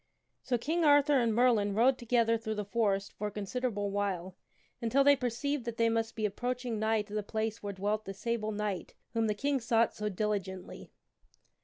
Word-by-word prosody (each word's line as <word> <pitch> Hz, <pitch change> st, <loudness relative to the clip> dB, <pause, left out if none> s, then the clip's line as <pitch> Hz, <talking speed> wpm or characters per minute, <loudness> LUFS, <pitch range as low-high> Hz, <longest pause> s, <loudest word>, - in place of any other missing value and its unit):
SO 245 Hz, -, 0 dB
King 325 Hz, +8 st, -1 dB
Arthur 290 Hz, -1 st, +5 dB
and 235 Hz, -2 st, +2 dB
Merlin 220 Hz, -4 st, +3 dB
rode 250 Hz, +4 st, +4 dB
together 235 Hz, -1 st, +2 dB
through 220 Hz, -1 st, -3 dB
the 210 Hz, -1 st, -3 dB
forest 200 Hz, -2 st, 0 dB
for 210 Hz, -, -3 dB
a -, -, -5 dB
considerable 205 Hz, 0 st, -2 dB
while, 190 Hz, -3 st, -2 dB, 0.5 s
until 240 Hz, +4 st, +3 dB
they 285 Hz, 0 st, +7 dB
perceived 265 Hz, +2 st, -2 dB
that 235 Hz, -1 st, -4 dB
they 230 Hz, 0 st, +3 dB
must 225 Hz, 0 st, -1 dB
be 215 Hz, -, -1 dB
ap 205 Hz, -1 st, -2 dB
proaching 245 Hz, -2 st, -2 dB
nigh 220 Hz, 0 st, +1 dB
to 205 Hz, 0 st, -13 dB
the 210 Hz, -, 0 dB
place 220 Hz, +1 st, -3 dB
where 205 Hz, -, -4 dB
dwelt 205 Hz, +3 st, -1 dB
the 195 Hz, -, -5 dB
Sable 225 Hz, 0 st, -2 dB
Knight 205 Hz, -3 st, -3 dB, 0.2 s
whom 225 Hz, -1 st, +1 dB
the 210 Hz, -, 0 dB
King 280 Hz, +5 st, 0 dB
sought 230 Hz, -1 st, +2 dB
so 210 Hz, 0 st, -3 dB
diligently. 195 Hz, -2 st, -3 dB
225 Hz, 195 wpm, -31 LUFS, 205-245 Hz, 0.5 s, they